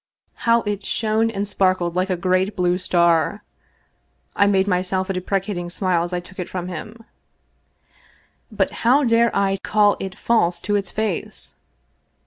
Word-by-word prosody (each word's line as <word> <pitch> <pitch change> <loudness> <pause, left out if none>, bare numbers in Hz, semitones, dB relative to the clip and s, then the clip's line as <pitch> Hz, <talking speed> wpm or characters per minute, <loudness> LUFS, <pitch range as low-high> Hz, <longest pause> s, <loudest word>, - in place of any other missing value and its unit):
How 230 0 +5
it 205 -1 -3
shone 220 +2 0
and 205 -2 -3
sparkled 185 -3 +1
like 185 +1 0
a 185 - 0
great 185 +2 +1
blue 180 0 +1
star! 175 +2 +2 0.9
I 200 - +4
made 195 -1 +2
myself 185 +1 0
a - - -2
deprecating 185 -1 -2
smile 180 -1 0
as 175 - -5
I 180 - -1
took 185 +2 -13
it 180 - -4
from 180 -1 -4
him, 215 +7 -8 1.5
but - - 0
how 265 +5 +5
dare 235 -1 +4
I 195 -1 +1
call 210 -1 +3
it 195 +1 -6
false 180 -7 +1
to 205 - -1
its 200 -2 -1
face 215 - -3
190 Hz, 155 wpm, -21 LUFS, 180-210 Hz, 1.5 s, How